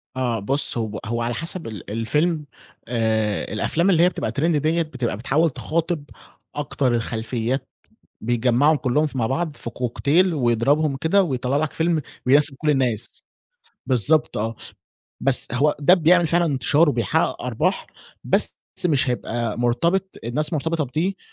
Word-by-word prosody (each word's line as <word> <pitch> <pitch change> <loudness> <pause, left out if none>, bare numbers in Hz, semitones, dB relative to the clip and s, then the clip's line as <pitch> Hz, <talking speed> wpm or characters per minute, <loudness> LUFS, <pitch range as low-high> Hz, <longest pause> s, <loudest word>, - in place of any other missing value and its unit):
آه، 125 -3 -1
بُص 135 +6 +1
هو 110 -2 -3
هو 115 +1 -2
على 120 +1 -1
حسب 165 +2 -4
ال 105 -5 -8
الفيلم. 150 +8 0 0.4
آآ 110 -4 -1
الأفلام 170 - +1
اللي 170 -3 +4
هي 180 - +5
بتبقى - - -4
Trend 150 - 0
ديَّة، 160 +1 +1
بتبقى 130 -9 -3
بتحاول 145 +8 +1
تِخاطب 165 +2 -2 0.5
أكتر 140 -4 0
الخلفيات 120 +3 -2 0.5
بيجمَّعهم 120 +6 +2
كلّهم 145 +3 +1
ف 135 - -11
مع 115 -3 0
بعض 155 +6 -1
في 120 - -4
كوكتيل 140 +10 +1
ويضربهم 135 +3 +1
كده 190 +7 +2
ويطلَّع 130 -3 -1
لك 155 0 -1
فيلم 165 -1 0 0.2
ويناسب 140 +2 +3
كل 155 - -1
الناس، 120 -5 -1 0.6
بالضبط 140 +5 +2
آه، 115 +2 -2 0.7
بس 135 -2 +3
هو 145 +4 +2
ده 150 +5 +5
بيعمل 175 0 +4
فعلًا 170 +2 +2
انتشَار 145 +2 +2
وبيحقق 115 -8 0
أرباح، - - -1 0.4
بس - - +2 0.3
مش 145 -5 +2
هيبقى 120 -2 -3
مرتبط 170 +11 0
الناس 150 +8 -1
مرتبطة 160 +1 -1
بدي 170 +9 -2
140 Hz, 145 wpm, -22 LUFS, 120-160 Hz, 0.7 s, هي